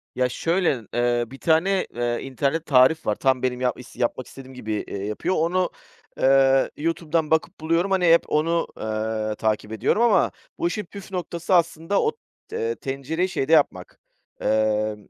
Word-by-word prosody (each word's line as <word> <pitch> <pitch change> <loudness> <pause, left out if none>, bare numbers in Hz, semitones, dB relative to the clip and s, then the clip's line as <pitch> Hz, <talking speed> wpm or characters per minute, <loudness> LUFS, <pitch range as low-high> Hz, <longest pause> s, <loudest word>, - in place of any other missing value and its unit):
Ya, 125 0 +1
şöyle: 165 -5 0
Eee, 120 0 +1
bir 135 +4 -11
tane, 180 +4 +2
eee, 120 0 -1
internet 140 +4 -2
tarif 140 +3 +4
var. 105 - +1
Tam 130 0 +1
benim 125 0 -1
yap 125 0 0
is 125 - -13
yapmak 120 +1 -2
istediğim 130 -1 -12
gibi, 110 -3 -6 0.2
eee, 100 0 -5
yapıyor. 105 - -2
Onu, 180 +3 +1 0.5
eee, 135 0 +4
YouTube'dan 165 0 -1
bakıp 160 - 0
buluyorum. 165 +4 0
Hani, 185 -2 +2
hep 170 - +4
onu, 165 +2 +1
eee, 110 0 -2
takip 110 0 -1
ediyorum 110 - +1
ama 235 - +4 0.3
bu 340 - 0
işin 210 - -3
püf 195 +2 -11
noktası 175 -1 -3
aslında 165 +2 +1
o 450 - +1 0.4
te 455 +1 -2
tencereyi 150 +7 -3
şeyde 150 -2 0
yapmak, 150 -3 +1 0.4
eee, 110 0 +1
140 Hz, 165 wpm, -23 LUFS, 120-170 Hz, 0.5 s, tarif